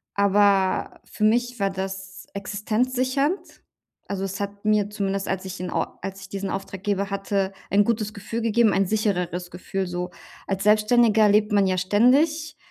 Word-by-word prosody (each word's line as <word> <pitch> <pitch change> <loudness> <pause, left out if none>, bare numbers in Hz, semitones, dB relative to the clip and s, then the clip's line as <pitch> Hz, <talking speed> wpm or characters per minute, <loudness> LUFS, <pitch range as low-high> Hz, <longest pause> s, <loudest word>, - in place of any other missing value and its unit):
Aber 200 -1 +2
für 215 - -5
mich 240 +2 +2
war 195 - +2
das 190 0 -6
existenzsichernd. 255 - -1 0.5
Also, 195 -1 -3
es 195 +1 -4
hat 200 +1 -5
mir 210 -1 +2
zumindest, 195 -1 -2
als 190 0 -2
ich 185 -1 -6
in 180 - -4
Or - - -3
als 195 0 -6
ich 190 - -11
diesen 195 0 -4
Auftraggeber 195 +1 -3
hatte, 195 -1 -1 0.2
ein 205 +1 +4
gutes 215 -1 -1
Gefühl 225 +3 -5
gegeben, 225 -1 +3
ein 195 -1 +2
sichereres 180 -4 -1
Gefühl. 190 +1 -3
So 180 0 -4 0.4
als 195 0 -2
Selbstständiger 215 0 +4
lebt 210 +1 +3
man 200 -2 +4
ja 185 0 +1
ständig, 275 - +2
200 Hz, 160 wpm, -24 LUFS, 195-215 Hz, 0.5 s, ein